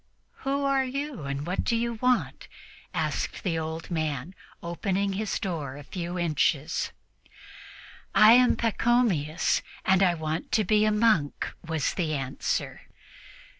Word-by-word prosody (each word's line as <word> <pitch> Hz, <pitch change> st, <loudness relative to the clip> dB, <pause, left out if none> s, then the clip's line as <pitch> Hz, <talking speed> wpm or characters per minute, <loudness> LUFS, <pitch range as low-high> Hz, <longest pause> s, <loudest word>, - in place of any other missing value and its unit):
"Who 275 Hz, +1 st, -1 dB
are 275 Hz, -1 st, +3 dB
you, 275 Hz, -, -4 dB
and 140 Hz, +1 st, -3 dB
what 180 Hz, +2 st, -1 dB
do 235 Hz, -, +1 dB
you 235 Hz, +1 st, 0 dB
want?" 250 Hz, +2 st, 0 dB, 0.4 s
asked -, -, -2 dB
the 165 Hz, -4 st, 0 dB
old 160 Hz, +2 st, -5 dB
man, 155 Hz, -1 st, -2 dB, 0.3 s
opening 195 Hz, +3 st, -1 dB
his 210 Hz, +2 st, -2 dB
door 155 Hz, -9 st, -4 dB
a 145 Hz, -, -9 dB
few 175 Hz, +3 st, -5 dB
inches. 155 Hz, -2 st, 0 dB, 1.2 s
"I 215 Hz, +1 st, +8 dB
am 250 Hz, 0 st, +5 dB
called 230 Hz, -2 st, 0 dB
Pachomius, 205 Hz, -11 st, +2 dB, 0.2 s
and 190 Hz, 0 st, +4 dB
I 180 Hz, -3 st, +4 dB
want 160 Hz, 0 st, -4 dB
to 215 Hz, -, +4 dB
be 210 Hz, +2 st, +3 dB
a 215 Hz, -, +3 dB
monk," 210 Hz, -9 st, +1 dB
was 160 Hz, -4 st, -1 dB
the 160 Hz, -4 st, -1 dB
answer. 135 Hz, -1 st, -3 dB
180 Hz, 140 wpm, -27 LUFS, 155-225 Hz, 1.2 s, I